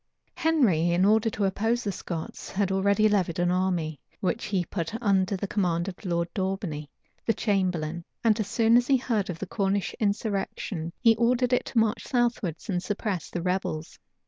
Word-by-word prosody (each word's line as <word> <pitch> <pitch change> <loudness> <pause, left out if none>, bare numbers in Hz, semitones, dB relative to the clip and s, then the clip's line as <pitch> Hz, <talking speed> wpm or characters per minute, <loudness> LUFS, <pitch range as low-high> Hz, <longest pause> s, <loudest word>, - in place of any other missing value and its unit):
Henry, 235 - +3
in 175 +2 +3
order 220 +2 +4
to 205 -2 -1
oppose 225 +5 0
the 205 - -1
Scots, 170 -3 -6
had 195 -1 0
already 200 +3 +3
levied 190 -6 +1
an 175 0 +2
army, 175 -5 0 0.2
which 210 +4 -1
he 190 -4 0
put 180 +6 -4
under 200 -3 +2
the 200 - -3
command 175 -4 0
of 190 +1 -7
Lord 170 -2 0
Daubeney, 185 -6 -3 0.3
the 225 - +1
chamberlain; 180 -5 0 0.2
and 225 -1 +3
as 215 - -1
soon 230 +2 +4
as 245 0 +2
he 275 - +5
heard 225 -6 -1
of 175 - -3
the 195 - -4
Cornish 195 0 -1
insurrection, 200 -5 -2
he 230 -3 +6
ordered 245 +2 +2
it 250 - +2
to - - -5
march 220 0 +2
southwards 240 - 0
and 180 -4 0
suppress 200 -3 -3
the 175 - -4
rebels. 180 -4 -2
195 Hz, 180 wpm, -27 LUFS, 175-220 Hz, 0.3 s, he